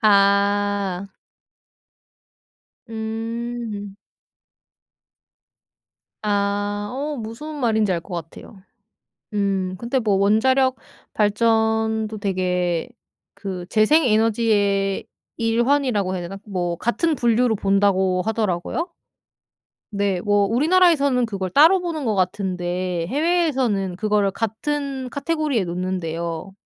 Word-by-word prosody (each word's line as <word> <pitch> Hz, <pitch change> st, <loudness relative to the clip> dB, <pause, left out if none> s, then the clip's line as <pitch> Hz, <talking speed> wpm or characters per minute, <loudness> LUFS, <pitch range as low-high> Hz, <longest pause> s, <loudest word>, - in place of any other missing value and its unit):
아. 200 Hz, -2 st, +2 dB, 1.8 s
음. 225 Hz, -2 st, -5 dB, 2.3 s
아 205 Hz, 0 st, -1 dB
어 290 Hz, +2 st, -3 dB
무슨 235 Hz, +7 st, -7 dB
말인지 220 Hz, -5 st, +2 dB
알 170 Hz, -, -1 dB
것 180 Hz, +2 st, -9 dB
같아요. 170 Hz, +4 st, -9 dB, 0.7 s
음. 195 Hz, -2 st, 0 dB
근데 240 Hz, +4 st, -1 dB
뭐 210 Hz, -4 st, +1 dB
원자력 260 Hz, +7 st, +3 dB, 0.4 s
발전도 220 Hz, 0 st, +1 dB
되게 180 Hz, -2 st, -1 dB, 0.5 s
그 185 Hz, -3 st, -6 dB
재생 260 Hz, +9 st, +4 dB
에너지의 215 Hz, -3 st, +2 dB, 0.3 s
일환이라고 230 Hz, -3 st, +1 dB
해야 180 Hz, -, -3 dB
되나 185 Hz, +3 st, -6 dB
뭐 180 Hz, -4 st, -2 dB
같은 310 Hz, +7 st, 0 dB
분류로 240 Hz, -1 st, +2 dB
본다고 195 Hz, -2 st, +2 dB
하더라고요? 220 Hz, -, -1 dB, 1.0 s
네, 200 Hz, -3 st, 0 dB
뭐 205 Hz, 0 st, +2 dB
우리나라에서는 285 Hz, -, +3 dB
그걸 195 Hz, -4 st, -3 dB
따로 325 Hz, -, +6 dB
보는 325 Hz, -5 st, -3 dB
것 220 Hz, -, +1 dB
같은데 180 Hz, -2 st, -1 dB
해외에서는 265 Hz, -, +1 dB
그거를 205 Hz, -1 st, +1 dB
같은 265 Hz, +4 st, -3 dB
카테고리에 285 Hz, -, -1 dB
놓는대요. 170 Hz, 0 st, -4 dB
210 Hz, 210 characters per minute, -22 LUFS, 195-240 Hz, 2.3 s, 따로